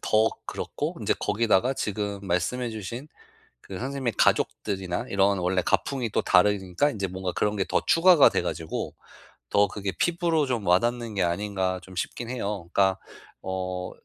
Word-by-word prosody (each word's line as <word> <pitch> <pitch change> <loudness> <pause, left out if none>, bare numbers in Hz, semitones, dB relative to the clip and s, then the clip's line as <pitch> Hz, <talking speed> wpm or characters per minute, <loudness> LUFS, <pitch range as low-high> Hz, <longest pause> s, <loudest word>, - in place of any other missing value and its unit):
더 110 +1 +3 0.2
그렇고 - - -4
인제 - - +1
거기다가 115 +3 +2
지금 105 -2 -3
말씀해 115 +8 -1
주신 115 +6 -6 0.5
그 95 +6 -8
선생님의 130 -2 -2
가족들이나 95 +2 0
이런 100 0 +2
원래 90 0 +1
가풍이 130 -5 0
또 - - +1
다르니까 95 +6 +3
인제 100 -7 -3
뭔가 95 0 -4
그런 105 +3 0
게 95 - +1
더 - - +1
추가가 170 -3 +7
돼 - - 0
가지고 80 0 -4 0.6
더 100 0 +4
그게 100 -1 -4
피부로 170 -3 +1
좀 120 -6 -2
와닿는 115 +5 +1
게 95 - 0
아닌가 95 +1 -1
좀 95 - -13
싶긴 115 +6 -4
해요. 100 -8 -4
그러니까 95 -1 +3 0.4
어 95 -1 -3
100 Hz, 335 characters per minute, -26 LUFS, 95-120 Hz, 0.6 s, 추가가